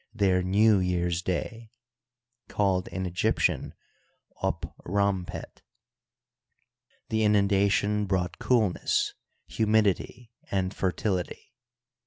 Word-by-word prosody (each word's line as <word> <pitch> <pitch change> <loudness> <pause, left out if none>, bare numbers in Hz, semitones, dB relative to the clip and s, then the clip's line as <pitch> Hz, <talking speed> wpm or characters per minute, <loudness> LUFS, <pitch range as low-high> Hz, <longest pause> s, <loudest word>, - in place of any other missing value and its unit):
their 95 -4 +2
New 100 +3 +4
year's 90 -2 0
day 110 +6 -4 0.8
(called 95 -3 +1
in 95 +2 -4
Egyptian 90 -1 0 0.7
up - - -2
rompet). 100 -1 -2 1.5
The 110 0 +1
inundation 100 0 +2
brought 95 -2 -1
coolness, 110 -8 +1 0.3
humidity, 110 +2 0 0.2
and 95 -1 -1
fertility. 90 0 -2
100 Hz, 80 wpm, -27 LUFS, 90-105 Hz, 1.5 s, New